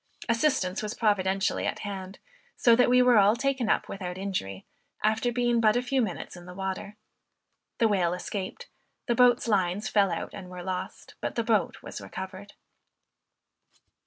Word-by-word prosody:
Assistance 230 -6 +1
was 215 +2 -4
providentially 195 -3 +1
at - - -2
hand, 195 -1 -6 0.4
so 235 -2 +5
that 245 +1 +4
we 250 0 +6
were 245 -3 +6
all 205 +2 +5
taken 265 -2 0
up - - +1
without 180 -2 -5
injury, 100 - -4 0.4
after 220 +3 +2
being 240 -1 +1
but 215 0 +4
a 245 - +2
few 260 +1 +1
minutes 195 -5 -4
in 175 0 -12
the 180 - -9
water. 195 +2 -5 0.8
The 230 - +4
whale 180 -4 +1
escaped; 195 - -5 0.4
the 240 - +1
boat's 245 0 +4
lines 200 -1 +1
fell 200 -2 +3
out - - -4
and 190 -3 -9
were 180 -1 -8
lost, 185 0 -5
but - - -3
the 235 - 0
boat 220 -3 0
was - - -7
recovered. 190 +2 -8
205 Hz, 165 wpm, -27 LUFS, 190-235 Hz, 0.8 s, we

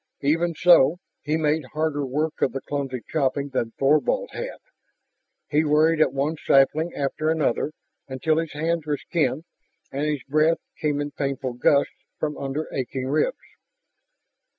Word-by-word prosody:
Even 165 +4 +1
so, 170 -2 +6 0.2
he 150 +2 0
made 155 0 +1
harder 155 -2 0
work 150 +4 -2
of - - +2
the 135 - -4
clumsy 135 -4 -4
chopping 140 -2 0
than 125 -4 -1
Thorvald 155 - +2
had. - - -5 0.9
He 150 +1 +2
worried 155 +1 +3
at 145 - +4
one 140 +4 -1
sapling 155 +5 +3
after 145 +2 -1
another 155 -2 +1 0.4
until 150 +4 0
his 165 -2 -4
hands 160 +1 -1
were 145 -1 0
skinned 150 -2 -1 0.5
and 140 +2 -2
his 150 -5 -2
breath 155 +4 +2 0.2
came 145 -1 0
in 145 0 -4
painful 135 -3 -3
gusts 140 +3 +2 0.2
from 150 -1 -2
under 140 +3 -3
aching 130 0 -3
ribs. 330 - +1
150 Hz, 150 wpm, -24 LUFS, 135-160 Hz, 0.9 s, so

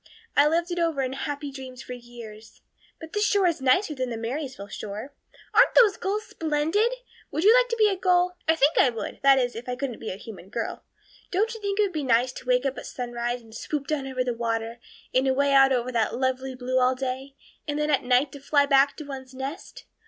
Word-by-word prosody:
I 285 +1 +6
lived 335 +3 0
it 350 - -2
over 325 -5 +1
in 260 0 -2
happy 285 +1 -4
dreams 260 -1 -9
for 250 - -7
years. 235 -3 -12 0.4
But 320 -1 -10
this 415 - +1
shore 405 -2 +3
is 335 -5 +1
nicer 300 +7 +3
than 260 -3 -3
the 230 - -4
Marysville 250 -2 -5
shore. 210 +7 -7 0.4
Aren't 475 +4 +5
those 435 -6 +6
gulls 415 +3 -2
splendid? 325 +9 0 0.4
Would 310 +3 -2
you 430 +3 +8
like - - +4
to 465 - 0
be 430 -1 +5
a 400 - +1
gull? 360 -1 +2
I 320 - +4
think 295 -1 +3
I 260 - +6
would 230 -2 -6
that 275 -1 +6
is, 245 -2 0
if 235 +2 -7
I 250 - -1
couldn't 260 -2 -4
be 220 - -5
a - - -4
human 195 -2 -11
girl. 225 +1 -4 0.5
Don't 430 +5 0
you 450 - -9
think 400 -1 -2
it - - +6
would 390 -3 -2
be 310 - -2
nice 250 -1 +2
to 255 - -11
wake 250 +1 +2
up 270 -2 -1
at - - -9
sunrise 240 -1 -4
and 225 -1 -16
swoop 285 +5 -4
down 280 -2 -2
over 255 -1 -1
the 250 -1 -1
water 230 0 -3 0.3
and 260 +1 +3
away 275 +1 +2
out 270 0 +6
over 250 -1 0
that 230 -2 0
lovely 260 0 -1
blue 255 +1 0
all 255 +1 +3
day; 265 +1 -4 0.3
and 290 0 -2
then 300 0 0
at 275 - +3
night 255 +2 +2
to 285 - -10
fly 285 +1 +3
back 280 0 +4
to 305 - -6
one's 265 -2 -9
nest? 270 +7 -7
270 Hz, 235 wpm, -26 LUFS, 250-315 Hz, 0.5 s, you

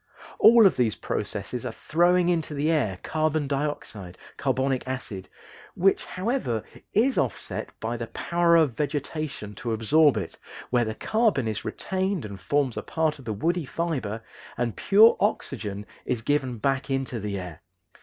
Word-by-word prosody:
All 230 -1 +8
of 195 - +4
these 120 -4 +2
processes 105 +3 -4
are - - -3
throwing 175 +2 +2
into 165 -3 -1
the 150 +3 +1
air 110 - +1
carbon 155 -2 0
dioxide 135 -10 -4 0.2
(carbonic 130 -1 0
acid), 115 -8 -5 0.5
which, 195 +2 +2
however, 185 - -2 0.3
is 255 +6 +3
offset 130 -5 -3
by 115 +2 -3
the 115 0 -5
power 170 +7 +2
of 160 -5 +4
vegetation 145 -5 -3
to 115 +3 -3
absorb 145 +7 +4
it, - - -5 0.3
where 120 -1 +3
the 110 0 -3
carbon 215 - +1
is 105 -1 -3
retained 190 - -2
and 100 -2 -8
forms 140 +1 0
a - - -1
part 160 -2 -1
of 135 - -13
the 110 - -2
woody 165 - 0
fiber 130 -11 -3 0.3
and 120 -2 -1
pure 215 +3 +6
oxygen 105 - -2 0.2
is 120 -3 -2
given 130 -3 0
back 135 +5 -1
into 135 -3 -2
the 105 -1 -3
air. 90 -5 -7
135 Hz, 155 wpm, -26 LUFS, 110-165 Hz, 0.5 s, All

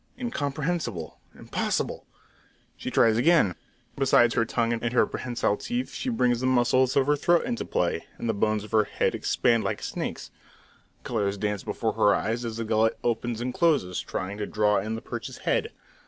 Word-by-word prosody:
Incomprehensible! 145 - -3 0.2
Impossible! - - -2 0.7
She - - -5
tries 115 -1 +4
again. 140 - +4 0.4
Besides 130 -3 +4
her 115 - +2
tongue 115 +1 0
and 115 +1 -2
her - - +4
prehensile 120 -4 -1
teeth, 245 +2 -3
she 260 - -3
brings 125 - +2
the 130 - 0
muscles 130 0 +3
of 135 - +4
her 145 +1 +3
throat 170 +4 +2
into 240 -1 -2
play, 85 -1 -1
and - - -4
the 115 - +1
bones 105 0 0
of 105 - -11
her 110 -2 +4
head - - 0
expand 115 -2 +1
like 100 +1 -2
a - - -10
snake's. - - -4 0.7
Colours 100 -3 -1
dance 105 -1 -2
before - - -2
her 100 -1 +4
eyes 115 +5 -2
as 115 -1 -4
the 115 - -2
gullet 110 0 +2
opens 120 0 -1
and 125 +1 -2
closes, 145 - +1
trying 100 +2 -5
to 105 - -2
draw 105 -1 +2
in 110 +1 -3
the 115 - -6
perch's - - -6
head. - - +1
115 Hz, 185 wpm, -26 LUFS, 105-130 Hz, 0.7 s, tries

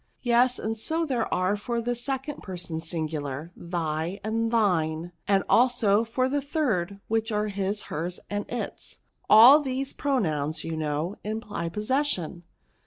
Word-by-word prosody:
Yes; 245 +1 +4
and 220 +1 -2
so 320 +9 -1
there 250 -6 -1
are 185 +3 +1
for 235 +3 -2
the 240 +1 -1
second 265 +4 -3
person 175 -3 -5
singular, 155 -2 -4
thy 170 +1 -3
and 225 +1 0
thiney 175 -7 +1 0.2
and 195 -1 +3
also 230 -4 +4
for 255 +3 0
the 285 +2 0
third, 220 - -1
which 225 +1 0
are, 210 0 0
his^ 200 +1 -1
hers, 170 +4 -3
and 205 0 -4
its. 245 - -5 0.3
All 240 +7 +10
these 270 -1 -3
pronouns, 160 - -1
you 165 0 -3
know, 155 +5 -2
imply 210 -5 -4
posses 260 - 0
sion. 175 - -3
210 Hz, 150 wpm, -26 LUFS, 170-245 Hz, 0.3 s, All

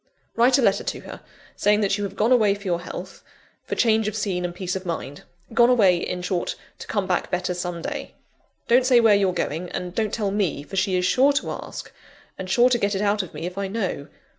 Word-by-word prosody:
Write 250 +3 +4
a 270 - +1
letter 200 -3 +2
to - - -4
her, - - -10 0.3
saying 210 +1 +2
that 200 -1 +2
you 205 - -3
have 200 - -5
gone 220 +4 +1
away 215 -5 +4
for 200 - -12
your 175 -3 -1
health, 180 - -8 0.4
for - - -3
change 220 -2 +2
of 215 - -3
scene 195 -4 -2
and 175 -1 -4
peace 180 0 -3
of 190 - -4
mind 165 -5 -5 0.3
gone 235 +1 +5
away, 200 -8 +5
in 180 +1 -4
short, 180 -1 -2 0.2
to - - -9
come 205 -3 -1
back 185 -1 -1
better 180 0 -1
some 175 -1 -5
day. - - -5 0.5
Don't 245 +2 +5
say 250 -2 +6
where 225 -2 +5
you're 200 -2 +3
going, 175 0 -3
and 180 -1 -4
don't 215 0 -1
tell 205 -3 -1
me, 195 -8 -1
for 195 - -9
she 190 0 +1
is 180 0 +1
sure 270 +8 +4
to 280 - -1
ask, - - -7 0.4
and 185 -1 -7
sure 240 +6 +4
to 240 - +2
get 200 -1 0
it 190 - -1
out 205 0 +2
of 180 -5 -10
me 155 +3 -5
if 180 +2 -5
I 200 - -2
know. 190 -8 -3
195 Hz, 240 wpm, -23 LUFS, 180-220 Hz, 0.5 s, say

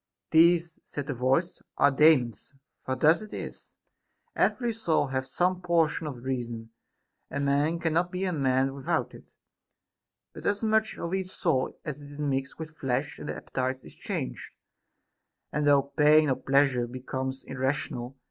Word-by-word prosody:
These, 170 0 +4
said 145 - -6
the 145 - -3
voice, 135 +8 0 0.2
are 145 - +5
Daemons; 135 -4 +3 0.3
for 130 - -2
thus 155 +9 +4
it 215 - -8
is. - - -8 0.6
Every 240 -2 +1
soul 175 -10 +1
hath 130 -1 -3
some 180 +6 0
portion 165 -3 +1
of 125 -5 -7
reason; 120 -3 -4 0.6
a 140 - -3
man 140 +4 +1
cannot 170 +1 0
be 185 +1 -2
a 185 - -1
man 135 -2 +1
without 135 -1 -1
it; - - -13 1.1
but - - -6
as 205 +2 0
much 220 0 +1
of 170 +2 -4
each 190 -1 -1
soul 150 -8 0
as 150 -2 -5
is 145 0 -11
mixed 135 -2 -2
with 160 0 -8
flesh 135 +1 -2
and - - -6
appetite 130 0 -3
is - - -12
changed, - - -5 1.0
and 150 0 0
through 140 -1 +4
pain 150 0 +5
or - - +2
pleasure 135 -3 +2
becomes 130 +1 -4
irrational. 130 -1 -3
145 Hz, 155 wpm, -28 LUFS, 130-165 Hz, 1.1 s, are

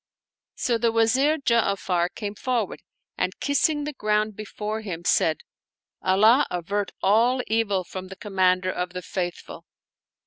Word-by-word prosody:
So 235 -2 0
the 230 0 +2
Wazir 255 +7 +3
Ja'afar 200 - +1
came 205 -2 -4
forward 235 -1 -2 0.4
and - - -1
kissing 295 +1 +1
the 300 +1 -4
ground 215 -3 0
before 215 +1 -5
him, 175 -5 -6
said, 160 -3 +2 0.6
"Allah 215 +9 +4
avert 195 +4 -2
all 240 +5 +3
evil 210 -4 0
from 185 +1 -7
the 190 - -9
Commander 185 -2 +1
of 180 0 -4
the 180 0 -5
Faithful 175 -2 -5
210 Hz, 135 wpm, -25 LUFS, 185-235 Hz, 0.6 s, Allah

